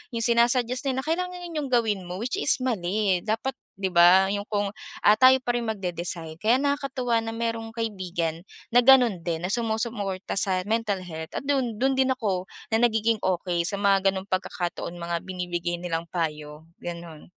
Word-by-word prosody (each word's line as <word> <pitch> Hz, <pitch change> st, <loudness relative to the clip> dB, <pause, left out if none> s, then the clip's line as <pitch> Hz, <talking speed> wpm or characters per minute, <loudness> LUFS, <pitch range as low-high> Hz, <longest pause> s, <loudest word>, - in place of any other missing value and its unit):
yung 230 Hz, -, -1 dB
sina-suggest 240 Hz, +2 st, +2 dB
nila 265 Hz, 0 st, -1 dB
na -, -, -11 dB
kailangan 360 Hz, +2 st, -2 dB
'yun 340 Hz, -1 st, -7 dB
'yung 285 Hz, -, -3 dB
gawin 215 Hz, -7 st, +1 dB
mo 180 Hz, -, -5 dB
which 310 Hz, +12 st, -2 dB
is 295 Hz, -, +3 dB
mali 195 Hz, -4 st, 0 dB
dapat, 225 Hz, +5 st, -1 dB, 0.3 s
'di 190 Hz, -1 st, -2 dB
ba 175 Hz, +3 st, +7 dB
'yung 205 Hz, +1 st, -4 dB
kung, 205 Hz, -2 st, -1 dB, 0.3 s
ah, 210 Hz, +1 st, +7 dB
tayo 260 Hz, 0 st, +8 dB
pa 240 Hz, -, +1 dB
rin 230 Hz, -, -4 dB
magde-decide 170 Hz, -5 st, -3 dB
kaya 220 Hz, +5 st, +3 dB
nakakatuwa 275 Hz, -4 st, 0 dB
na 225 Hz, 0 st, -5 dB
merong 230 Hz, -1 st, -3 dB
kaibigan 185 Hz, -7 st, -3 dB, 0.3 s
na 245 Hz, -, +6 dB
ganon 245 Hz, -6 st, +6 dB
din 170 Hz, -1 st, -2 dB
na -, -, -2 dB
sumusuporta 220 Hz, -5 st, -2 dB
sa 185 Hz, -2 st, +1 dB
mental 215 Hz, -4 st, 0 dB
health 160 Hz, -2 st, -8 dB
at -, -, -2 dB
dun 265 Hz, -5 st, 0 dB
dun 270 Hz, -, +3 dB
din 265 Hz, -, +4 dB
ako 190 Hz, -6 st, -2 dB, 0.3 s
na 225 Hz, -, +3 dB
nagiging 225 Hz, -1 st, +2 dB
okey 175 Hz, -2 st, -1 dB
sa 200 Hz, -, -1 dB
mga 195 Hz, -1 st, +3 dB
ganong 190 Hz, +1 st, -6 dB
pagkakataon 175 Hz, -2 st, -3 dB
mga 170 Hz, 0 st, -3 dB
binibigay 175 Hz, -1 st, -3 dB
nilang 165 Hz, -1 st, -3 dB
payo, 150 Hz, -3 st, -4 dB, 0.2 s
ganon. 170 Hz, -3 st, -8 dB
205 Hz, 180 wpm, -25 LUFS, 175-235 Hz, 0.3 s, tayo